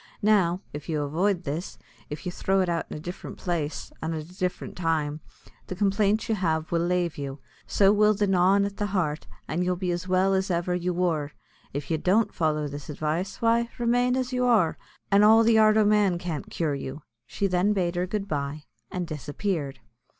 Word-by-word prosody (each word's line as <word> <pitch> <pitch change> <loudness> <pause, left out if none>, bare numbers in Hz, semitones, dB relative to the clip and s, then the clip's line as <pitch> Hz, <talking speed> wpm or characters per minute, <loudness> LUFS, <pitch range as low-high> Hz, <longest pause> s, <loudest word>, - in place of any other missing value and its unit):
Now, 190 -4 +3
if 150 +3 -7
you 150 -2 0
avoid 175 +6 0
this, 155 +5 -4 0.3
if 150 +5 -7
you 180 - -2
throw 195 +2 +1
it 185 - 0
out 170 -1 -1
in - - -6
a - - -7
different 175 +4 -7
place, 160 -4 -3
an' 160 +1 -2
at 155 - -4
a 180 +3 -16
different 180 -1 -3
time, 155 -3 -1 0.5
the 185 - -5
complaint 205 +3 +1
you 225 - +1
have 160 -5 -1
will 170 -1 +2
lave 175 -2 0
you: 140 0 -5 0.3
so 200 0 +4
will 210 0 +4
the 205 +1 +1
gnawin' 195 +1 +4
at 200 0 -5
the 205 - -1
heart; 155 -4 -1 0.2
an' 165 +3 -1
you'll 180 0 +1
be 180 0 -2
as 175 +1 -3
well 185 +1 +3
as 190 0 0
ever 175 0 0
you 180 0 -1
wor. 165 -5 -1 0.4
If 145 +2 -5
you 160 - +1
don't 200 +5 +2
follow 155 -3 0
this 145 +1 -8
advice, 155 +9 -3
why, 230 +1 +3
remain 245 +1 +2
as 255 0 -2
you 250 0 +1
are, 215 -9 +3 0.4
an' 200 +1 +6
all 220 +2 +7
the 225 -1 +5
art 215 0 +5
o' 215 - +5
man 205 -4 +3
can't 170 -5 -5
cure 160 -4 -1
you." 140 +1 -6 0.2
She 200 - -2
then 185 +2 +2
bade 180 -4 0
her 180 +1 0
good 200 +1 -3
bye, 145 -2 -3 0.3
and 180 -1 -3
disappeared. 150 0 -3
180 Hz, 210 wpm, -26 LUFS, 160-200 Hz, 0.5 s, all